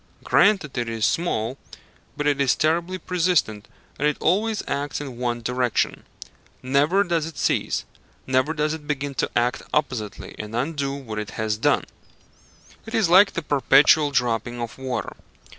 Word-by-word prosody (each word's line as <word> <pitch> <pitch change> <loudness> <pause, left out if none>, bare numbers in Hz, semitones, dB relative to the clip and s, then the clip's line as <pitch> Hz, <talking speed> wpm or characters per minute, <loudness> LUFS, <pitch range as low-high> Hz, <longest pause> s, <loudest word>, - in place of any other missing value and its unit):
Granted 195 -8 +3
it 120 -1 -2
is 115 -1 -1
small, 130 -7 -1 0.6
but 150 - -2
it 145 -1 +2
is 130 -3 +3
terribly 170 +4 0
persistent; 175 - 0 0.3
and 145 - +2
it 150 - 0
always 210 +5 +1
acts 145 0 -2
in 135 -4 -7
one 120 -1 -2
direction. 125 -1 -1 0.6
Never 145 +9 +3
does 170 -4 -1
it 165 - -10
cease: - - 0 0.4
never 130 +4 +1
does 150 +1 0
it 155 -2 -8
begin 145 -1 -2
to - - -1
act 120 +1 +1
oppositely 125 -8 -2
and 105 +1 -6
undo 140 +1 -2
what 115 -6 -6
it 105 -1 -5
has 110 -1 0
done. 110 - +2 1.0
It 225 - -4
is 220 -6 +2
like 190 +4 +6
the 170 - -3
perpetual 145 +2 +4
dropping 120 -2 -1
of 120 +2 -6
water. 130 -1 -3
140 Hz, 160 wpm, -23 LUFS, 120-160 Hz, 1.0 s, like